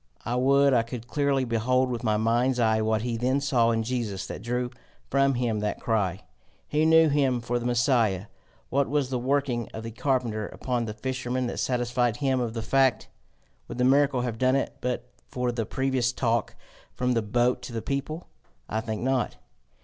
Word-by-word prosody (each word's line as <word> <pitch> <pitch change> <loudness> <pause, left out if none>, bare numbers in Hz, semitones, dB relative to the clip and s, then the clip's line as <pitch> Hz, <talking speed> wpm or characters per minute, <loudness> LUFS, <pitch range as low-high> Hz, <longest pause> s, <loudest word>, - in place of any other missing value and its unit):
I 120 - -1
would 140 +2 +4
I 120 - +5
could 115 0 -7
clearly 140 -1 +1
behold 125 +2 +1
with 120 0 -4
my 110 -2 +2
mind's 120 +3 +1
eye 110 -1 +3
what 110 0 +1
he 120 -1 -2
then 130 +4 +1
saw 125 -4 +2
in 115 -1 +1
Jesus 110 -6 -3
that - - -7
drew 120 +2 -2 0.4
from 135 0 +3
him 120 -3 0
that 105 0 -2
cry! 100 -5 -1 0.4
He 155 +1 +2
knew 160 0 +6
him 140 -4 +2
for 120 +1 -2
the 120 - -3
Messiah: 120 -6 +2 0.5
what 140 +1 +1
was 140 -2 0
the 125 - 0
working 130 -2 0
of 110 - -6
the 115 - -6
carpenter 115 -3 -1
upon 125 -2 -2
the 105 -1 -5
fisherman 125 +1 -2
that 120 - -3
satisfied 120 -2 0
him 135 -1 +1
of 120 -2 -2
the 115 - -3
fact? 135 -3 +2 0.6
Would - - -7
the 125 - +1
miracle 135 0 +4
have 120 -2 -3
done 130 +1 +3
it 135 - -1
but 125 -1 -2 0.2
for 125 -1 -1
the 115 -3 -3
previous 130 -2 0
talk 115 -3 -1 0.4
from 125 0 +1
the 115 - +1
boat 120 +4 +1
to 125 - -8
the 115 -1 -4
people? 140 +4 -3 0.4
I 110 - -2
think 110 0 -4
not. 130 -1 0
125 Hz, 195 wpm, -26 LUFS, 115-130 Hz, 0.6 s, knew